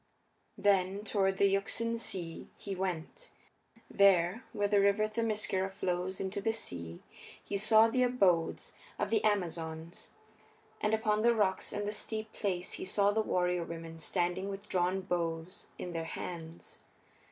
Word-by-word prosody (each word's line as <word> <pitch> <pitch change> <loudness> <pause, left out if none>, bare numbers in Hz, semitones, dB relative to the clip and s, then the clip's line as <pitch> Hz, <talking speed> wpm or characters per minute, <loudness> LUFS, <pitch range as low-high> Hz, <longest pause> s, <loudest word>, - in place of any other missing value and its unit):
Then 195 0 +2
toward 195 -3 +1
the 200 - +4
Euxine 230 +4 0
Sea 175 -7 -4
he 200 - -5
went. 185 - -4 0.6
There, 195 +2 +4
where 205 -1 0
the 205 0 +3
River 200 +2 +3
Themiscyra 215 -4 -1
flows 185 -1 -2
into 195 +1 -3
the 225 +2 +1
sea 85 - -6 0.4
he - - -4
saw 220 +2 +6
the 255 +3 +1
abodes 195 -10 +2 0.2
of - - -2
the 220 -2 +2
Amazons. 165 -5 -2 0.7
And 210 +1 +3
upon 215 -1 +1
the 235 +1 +4
rocks 190 -4 +1
and 205 0 -2
the - - 0
steep 215 +1 -4
place 185 -4 -2
he - - -4
saw 200 +1 +3
the 220 +1 +1
warrior 180 -4 +1
women 165 -1 -7
standing 180 +3 -1
with 200 +1 -7
drawn 185 +1 +1
bows 170 -1 -3
in 180 - -5
their 165 -1 -3
hands. 165 0 -7
195 Hz, 150 wpm, -32 LUFS, 175-210 Hz, 0.7 s, saw